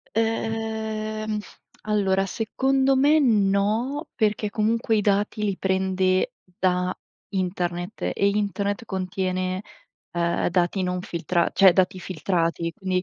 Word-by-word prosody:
Ehm, 220 -1 -2 0.4
allora 195 -2 +1
secondo 265 +6 +1
me 290 +4 +5
no, 220 +4 +1
perché 215 -2 0
comunque 225 +1 +1
i - - +3
dati 205 +1 +1
li 200 -3 0
prende 190 -1 +1 0.3
da 180 0 +1 0.4
internet 180 0 -3
e 200 - +2
internet 205 +1 -1
contiene, 185 -1 -2 0.5
ehm, 170 0 0
dati 180 +2 +1
non 180 0 -1
filtra 170 0 0
cioè 190 -2 +7
dati 185 +1 +2
filtrati, 170 -1 -1
quindi. 185 0 -1
195 Hz, 110 wpm, -24 LUFS, 185-215 Hz, 0.5 s, cioè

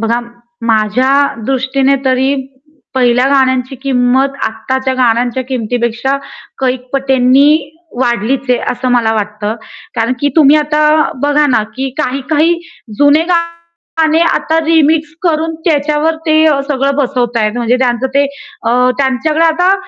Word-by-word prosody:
बघा, 230 +1 0 0.5
माझ्या 225 +4 +1 0.3
दृष्टीने 265 +1 +1
तरी 265 +1 +1 0.6
पहिल्या 250 0 +2
गाण्यांची 260 -1 +1
किंमत 260 0 +2
आताच्या 260 +4 -2
गाण्यांच्या 245 0 +1
किमतीपेक्षा 245 +1 -1 0.4
कैक 255 -1 -2
पटींनी 265 0 +3 0.5
वाढलीच 250 +2 -1
आहे, 245 - +3
असं 250 +1 -3
मला 235 -2 +2
वाटतं. 210 0 -3 0.4
कारण 230 +2 0
की 285 - +2
तुम्ही 300 -1 +6
आता 300 0 +2
बघा 290 +1 +2
ना, 245 -6 +2
की 265 +1 -2
काही-काही 305 +5 0 0.4
जुने 290 +2 +4
गाणे 335 -2 -1
आता 320 0 0
रिमिक्स 320 0 +2
करून 325 -2 0
त्याच्यावर 300 0 +1
ते 310 0 +4 0.2
सगळं 275 -1 0
बसवत 250 -4 -1
आहेत. 215 -2 +1
म्हणजे 240 0 +1
त्यांच 250 -1 0
ते 280 0 +3 0.4
अ, 250 +2 +2
त्यांच्याकडे 280 +4 +1
आता 355 +4 +3
265 Hz, 125 wpm, -13 LUFS, 245-300 Hz, 0.6 s, तुम्ही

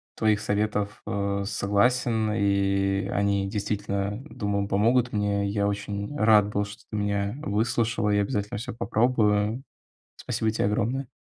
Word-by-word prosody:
твоих 105 -1 +2
советов, 105 -1 -1
э, 100 0 -1
согласен. 110 +2 +1
И 100 -1 +1
они 100 -1 0
действительно, 100 0 -2
думаю, 100 -1 -2
помогут 120 +5 +2
мне. 100 -1 0
Я 100 0 0
очень 100 +4 -4
рад 105 -3 +5
был, 100 0 0
что 105 - -11
ты 110 - -3
меня 100 +1 -1
выслушала, 115 -2 0
я 105 0 +3
обязательно 100 -1 -2
всё 110 - -5
попробую. 110 -1 +1 0.5
Спасибо 110 - -1
те - - -1
огромное. 120 +6 -1
105 Hz, 135 wpm, -26 LUFS, 100-110 Hz, 0.5 s, рад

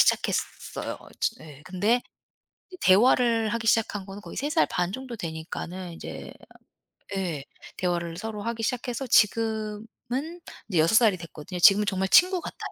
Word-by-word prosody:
시작했어요. - - 0 0.2
즈 - - +1
예. 150 -2 -13
근데 205 +7 +1 0.7
이제 365 - -11
대화를 230 +2 +4
하기 225 0 -2
시작한 210 -3 +1
거는 195 +1 -8
거의 - - -10
3 290 - -1
살 320 +1 +3
반 180 +1 -1
정도 260 -1 -6
되니까는 170 +1 -6
이제 - - -8 0.8
예 165 -7 -3 0.3
대화를 170 -2 -1
서로 215 0 -5
하기 230 0 -3
시작해서 250 +2 -2
지금은 225 - 0 0.3
이제 180 -6 0
6 165 +7 +4
살이 220 -5 +5
됐거든요. 170 +1 -8
지금은 200 +4 +6
정말 190 -1 0
친구 365 - +6
같아요. - - -8
210 Hz, 310 characters per minute, -26 LUFS, 180-235 Hz, 0.8 s, 지금은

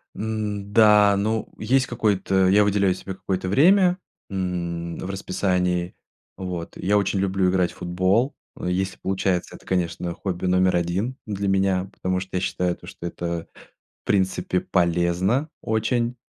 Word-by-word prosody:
М, 105 -2 -3
да, 105 -2 +6
ну, 110 +2 -1
есть 130 +4 +2
какой-то 95 -4 +1
Я 100 +3 +5
выделяю 100 -2 +2
себе 95 +1 -7
какое-то 95 0 -3
время, 180 - +5 0.3
м, 85 -3 -3
в - - -6
расписании. 90 -2 -1 0.4
Вот. 90 -3 -5
Я 100 +3 +2
очень 100 -1 0
люблю 95 -1 +1
играть 90 -2 +1
в - - -17
футбол. 95 +9 +1 0.3
Если 95 +1 -1
получается, 95 -1 -1
это, - - -16
конечно, 85 -1 -1
хобби 90 0 -4
номер 90 0 +3
1 90 +9 -1
для 100 -3 -3
меня, 95 -1 +1
потому 95 0 -1
что 95 0 -7
я - - -1
считаю, 90 -1 -1
то, - - -15
что - - -9
это, 85 -1 -4 0.6
в - - -75
принципе, 95 -2 +1
полезно 90 - +1
очень. 115 +2 0
95 Hz, 145 wpm, -23 LUFS, 90-105 Hz, 0.6 s, да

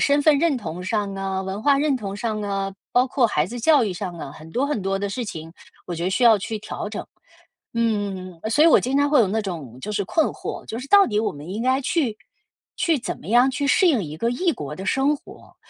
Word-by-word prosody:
身 285 +1 +3
份 295 -1 +5
认 330 -5 +2
同 180 -5 -6
上 200 0 -2
啊、 195 -1 -2
文 190 +3 -5
化 280 -1 +4
认 290 -2 +2
同 200 -4 -5
上 215 -1 -2
啊、 195 -1 -2 0.2
包 250 +1 +3
括 250 -3 +2
孩 150 -3 +1
子 240 +4 -6
教 290 -2 +5
育 200 - -2
上 180 0 -5
啊， 140 - -7
很 155 +2 -12
多 255 +10 0
很 285 -9 -2
多 195 0 -1
的 200 - -2
事 235 +5 -3
情， 165 -4 -7 0.3
我 175 - -4
觉 170 - -5
得 185 - 0
需 245 +6 +1
要 225 -2 +7
去 215 +2 -4
调 210 0 -6
整。 215 - -6 0.7
嗯， 200 -6 -2
所 295 +7 +4
以 335 - +7
我 - - +7
经 270 +3 0
常 285 - +3
会 290 -1 +4
有 210 - +4
那 220 +4 0
种 155 - -6
就 210 - -5
是 200 -1 -1
困 320 - +2
惑， - - -5
就 225 - -5
是 255 - -7
到 400 -1 +7
底 210 -2 0
我 220 - 0
们 145 +3 -10
应 210 +5 -3
该 260 +1 +2
去 280 - 0 0.6
去 325 -4 +2
怎 - - -5
么 - - -12
样 245 +4 +5
去 265 +2 -2
适 325 +6 +4
应 240 - +2
一 150 - -7
个 230 - 0
异 330 +8 +1
国 150 - -6
的 190 - -7
生 275 +6 +2
活？ - - -16
215 Hz, 275 characters per minute, -23 LUFS, 190-270 Hz, 0.7 s, 要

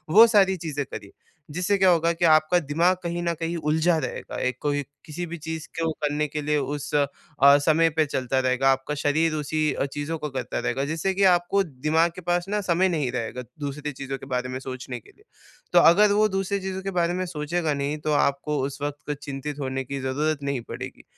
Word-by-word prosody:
वो 225 +2 +11
सारी 200 -4 +4
चीज़ें 150 -4 -3
करिए। - - -9 0.4
जिससे 180 +6 +1
क्या 190 -1 +5
होगा 170 -1 +3
कि 170 +1 0
आपका 155 +2 +5
दिमाग़ 165 +4 +2
कहीं 170 0 -2
न 170 0 0
कहीं 165 +1 -2
उलझा 160 +2 +2
रहेगा। 130 -6 -5
एक 125 -1 -3
कोई 145 -1 0 0.2
किसी 165 +3 -5
भी 170 0 -6
चीज़ 160 0 -6
को 165 -1 0
करने 150 +1 0
के 150 +1 -4
लिए 150 +1 +1
उस 145 +2 -3
अ, 145 -1 +4 0.5
समय 160 +3 +3
पे 155 - +4
चलता 130 -2 -1
रहेगा, 130 +1 +3
आपका 135 +3 -2
शरीर 155 +2 +2
उसी 155 0 0
अ, - - -1
चीज़ों 145 +3 -4
को 150 -1 -4
करता 130 -3 -3
रहेगा। 135 - -1
जिससे 160 +6 -1
कि 195 +1 +1
आपको 175 +3 +1
दिमाग़ 155 +2 +1
के - - -8
पास 175 0 0
न 210 0 0
समय 185 0 +2
नहीं 150 -8 -1
रहेगा, 125 0 -4 0.2
दूसरी 145 +1 -4
चीज़ों 135 0 -5
के - - -11
बारे 125 0 -2
में 130 0 -4
सोचने 130 -1 -6
के - - -21
लिए। 420 - -26 0.5
तो - - +8
अगर 205 +5 +6
वो 215 +1 +4
दूसरी 195 +1 -1
चीज़ों 190 0 -4
के 195 0 -4
बारे 170 0 +1
में 185 +1 -2
सोचेगा 160 -1 -2
नहीं, 140 +1 -2
तो 155 0 -2
आपको 145 +1 +1
उस 140 +1 -6
वक़्त 145 0 -4
चिंतित 140 +1 -5
होने 135 -1 -2
की 140 +2 -5
ज़रूरत 145 +3 -1
नहीं 140 -3 -2
पड़ेगी। - - -7
150 Hz, 215 wpm, -25 LUFS, 140-170 Hz, 0.5 s, वो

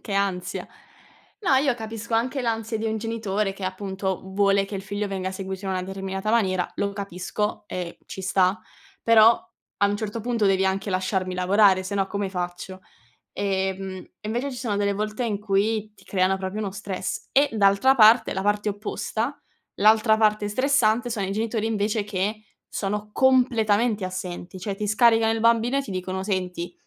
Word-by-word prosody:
che 205 - -7
ansia. 195 -3 -1 0.8
No, 350 -9 +3
io 270 -2 +3
capisco 225 0 -5
anche 255 +4 0
l'ansia 225 -1 -2
di 225 - -2
un 220 - -1
genitore 215 -3 -2
che 195 - -12
appunto, 190 0 -3
vuole 195 +1 +2
che 200 - -8
il 195 - -3
figlio 205 +1 -3
venga 190 -1 -3
seguito 190 0 -6
in - - -1
una 185 -1 -1
determinata 195 +2 -4
maniera, 185 -6 +1
lo 200 0 -1
capisco 200 +2 -3
e 180 -3 -5
ci 190 - -7
sta; 185 +1 +2 0.4
però 230 0 +6 0.4
a 200 - +4
un 205 0 0
certo 220 +1 -4
punto 230 -2 +1
devi 190 -1 +3
anche 190 +2 -1
lasciarmi 185 -1 -1
lavorare, 190 +1 +4
se 190 +2 -5
no, 195 -1 +1
come 200 -1 -3
faccio? 180 +1 -5 0.5
Ehm, 190 -1 -2 0.3
e - - -7
invece 245 +6 -2
ci 250 - -7
sono 230 -5 -2
delle 200 0 +1
volte 215 +4 -2
in 210 -3 -2
cui 210 +1 0
ti - - -20
creano 190 0 +1
proprio 190 +2 -4
uno 205 -3 -2
stress. 195 -1 -5
E 280 +1 +4
d'altra 210 +5 +4
parte, 225 0 +6
la 190 - -2
parte 205 +1 +1
opposta, 215 +5 -3 0.4
l'altra 220 +1 +5
parte 215 -1 +2
stressante 245 -1 +2
sono 215 -4 -2
i 190 - -3
genitori 220 +1 -1
invece 215 -1 0
che 210 +2 -2 0.3
sono 210 +1 -3
completamente 230 -5 +3
assenti, 185 0 -6
cioè 195 +2 -4
ti 210 - -3
scaricano 225 +1 +4
il 225 - -1
bambino 230 +3 +3
e - - +2
ti 270 - -10
dicono: 185 0 -3
"Senti, 180 -3 -3
205 Hz, 180 wpm, -24 LUFS, 190-225 Hz, 0.8 s, però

